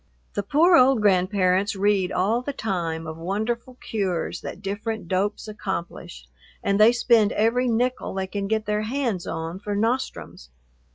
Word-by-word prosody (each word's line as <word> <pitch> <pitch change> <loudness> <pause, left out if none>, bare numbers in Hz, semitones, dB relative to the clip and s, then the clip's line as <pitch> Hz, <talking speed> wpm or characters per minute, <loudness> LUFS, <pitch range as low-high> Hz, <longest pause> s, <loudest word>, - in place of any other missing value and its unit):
The - - -1
poor 315 - +4
old 260 -4 +5
grandparents 190 0 +2
read 195 -1 +1
all 215 +6 +1
the 280 +3 -4
time 170 -9 -3
of 160 0 -6
wonderful 220 +8 -3
cures 190 -8 -3
that - - -7
different 205 0 -4
dopes 200 +4 -1
accomplish, 180 - -6 0.4
and 200 0 +1
they 215 +2 +8
spend 235 -3 +3
every 235 +4 +2
nickel 245 -1 -1
they 190 0 -1
can 195 +1 -4
get 220 +1 0
their 210 0 0
hands 230 -5 -2
on 165 +3 -4
for 205 0 -4
nostrums. 225 - -2
205 Hz, 155 wpm, -24 LUFS, 185-230 Hz, 0.4 s, they